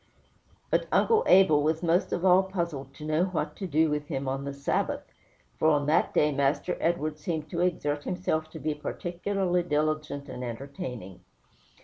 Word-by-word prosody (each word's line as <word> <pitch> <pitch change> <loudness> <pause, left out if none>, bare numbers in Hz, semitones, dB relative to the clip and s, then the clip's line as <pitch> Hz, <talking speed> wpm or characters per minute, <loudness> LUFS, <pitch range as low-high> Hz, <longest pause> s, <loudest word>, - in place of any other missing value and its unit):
But - - +1
Uncle 450 0 +4
Abel 185 -6 +6
was 160 +3 0
most 170 +2 +2
of 175 - -1
all 185 0 +7
puzzled 170 -8 -4
to 150 - -9
know 155 +3 +2
what 155 -5 -3
to 195 - -4
do 160 -1 +2
with 150 0 -2
him 135 0 -3
on 135 +1 -2
the 140 - -3
Sabbath, 140 0 -1 0.6
for 155 - +3
on 145 -2 +2
that 155 +3 +2
day 150 0 +3
Master 140 +5 0
Edward 155 -2 -1
seemed 155 -1 -4
to 170 - -1
exert 150 -5 0
himself 165 -4 -1
to 160 - -9
be 155 0 -1
particularly 180 +4 -2
diligent 150 -3 -1
and 125 -2 -6
entertaining. 125 -5 -6
155 Hz, 170 wpm, -28 LUFS, 145-175 Hz, 0.6 s, all